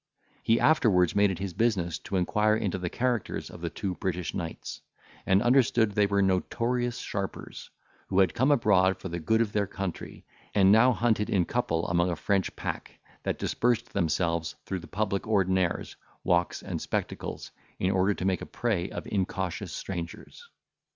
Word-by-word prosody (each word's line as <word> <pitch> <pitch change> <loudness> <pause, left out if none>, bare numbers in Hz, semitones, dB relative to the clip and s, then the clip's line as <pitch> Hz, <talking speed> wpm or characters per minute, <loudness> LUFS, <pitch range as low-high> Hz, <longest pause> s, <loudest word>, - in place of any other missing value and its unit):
He 115 +1 +3
afterwards 105 - +4
made 100 0 +5
it 95 - -3
his 95 0 -4
business 95 -6 0
to 100 - -5
inquire 105 +4 +2
into 95 -4 -1
the 90 -1 -3
characters 120 -1 -2
of 85 - -11
the 85 - -2
two 95 +3 -3
British 90 -1 -3
knights, 85 -3 -5 0.5
and 95 +3 +4
understood 120 -3 +4
they 100 0 +2
were 100 0 +2
notorious 120 +6 0
sharpers, 100 -1 -5 0.4
who 95 - -2
had 95 -5 +4
come 130 +4 +2
abroad 95 -9 +4
for 95 - -7
the 85 +1 -4
good 110 +8 +2
of 110 -3 0
their 100 -1 0
country, 95 -3 -6 0.3
and 95 -1 +6
now 115 +4 +6
hunted 110 -2 +1
in 90 -3 +2
couple 85 -9 -1
among 85 +1 +2
a 85 - -1
French 95 +4 0
pack, - - -5 0.2
that - - -2
dispersed 120 -2 0
themselves 85 -2 0
through 95 - -3
the 85 - -11
public 100 0 -2
ordinaries, 95 -4 +1 0.3
walks, 85 0 +1
and - - -4
spectacles, - - -4 0.3
in 95 - +1
order 95 +1 +2
to 95 - -4
make 95 -1 +1
a - - -6
prey 100 -7 -1
of - - -6
incautious 95 -3 -2
strangers. 90 - -7
95 Hz, 170 wpm, -28 LUFS, 90-110 Hz, 0.5 s, and